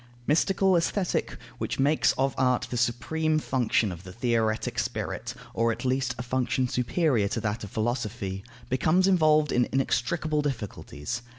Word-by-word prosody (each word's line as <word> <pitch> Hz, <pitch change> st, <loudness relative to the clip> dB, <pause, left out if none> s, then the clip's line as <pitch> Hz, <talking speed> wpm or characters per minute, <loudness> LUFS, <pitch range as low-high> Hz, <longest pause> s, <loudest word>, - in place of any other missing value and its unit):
Mystical 190 Hz, +6 st, +3 dB
Aesthetic, 175 Hz, +2 st, 0 dB, 0.2 s
which -, -, -2 dB
makes 145 Hz, +3 st, +3 dB
of 135 Hz, -1 st, 0 dB
art 125 Hz, -1 st, +2 dB
the -, -, -2 dB
supreme 155 Hz, +7 st, 0 dB
function 120 Hz, -7 st, +1 dB
of 85 Hz, 0 st, -8 dB
the 95 Hz, -, -9 dB
theoretic 115 Hz, 0 st, 0 dB
spirit, -, -, -3 dB, 0.2 s
or, 115 Hz, 0 st, +2 dB
at 115 Hz, +3 st, -5 dB
least, 130 Hz, -1 st, 0 dB
a 125 Hz, -, -4 dB
function 125 Hz, 0 st, 0 dB
superior 125 Hz, -, +1 dB
to -, -, -2 dB
that 110 Hz, +1 st, -2 dB
of 100 Hz, -, -6 dB
philosophy, 110 Hz, -4 st, -2 dB, 0.2 s
becomes 160 Hz, +9 st, +2 dB
involved 155 Hz, -5 st, +4 dB
in 125 Hz, 0 st, +2 dB
inextricable 150 Hz, +4 st, 0 dB
difficulties. 120 Hz, -, -4 dB
125 Hz, 150 wpm, -27 LUFS, 115-150 Hz, 0.2 s, involved